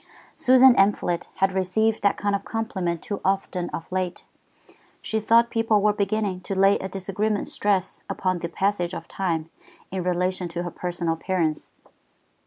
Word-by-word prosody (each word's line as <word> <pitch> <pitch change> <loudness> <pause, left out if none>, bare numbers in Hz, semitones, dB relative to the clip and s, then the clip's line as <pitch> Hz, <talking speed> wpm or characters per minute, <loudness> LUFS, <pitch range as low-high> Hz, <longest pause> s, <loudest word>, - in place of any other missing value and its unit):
Susan 260 0 +6
Amphlett 195 -3 +2
had 195 0 +2
received 215 +4 +1
that 200 - +2
kind 205 0 0
of 200 - -3
compliment 190 -7 -3
too 205 - -4
often 190 -2 -1
of 165 - -7
late. 185 -1 -2 0.7
She 220 - -2
thought 230 +2 +4
people 225 -2 +2
were 210 +1 +3
beginning 200 -2 -1
to 195 - -4
lay 195 +1 +4
a 190 - -5
disagreeable 200 +2 -2
stress 195 -2 -1
upon 185 -1 -1
the 170 - -4
passage 190 -1 -1
of - - -7
time 165 -4 -2 0.4
in 190 0 -2
relation 180 +1 -1
to 170 +1 -4
her 175 - -5
personal 175 -1 -2
appearance. 165 -2 -2
190 Hz, 160 wpm, -24 LUFS, 180-205 Hz, 0.7 s, Susan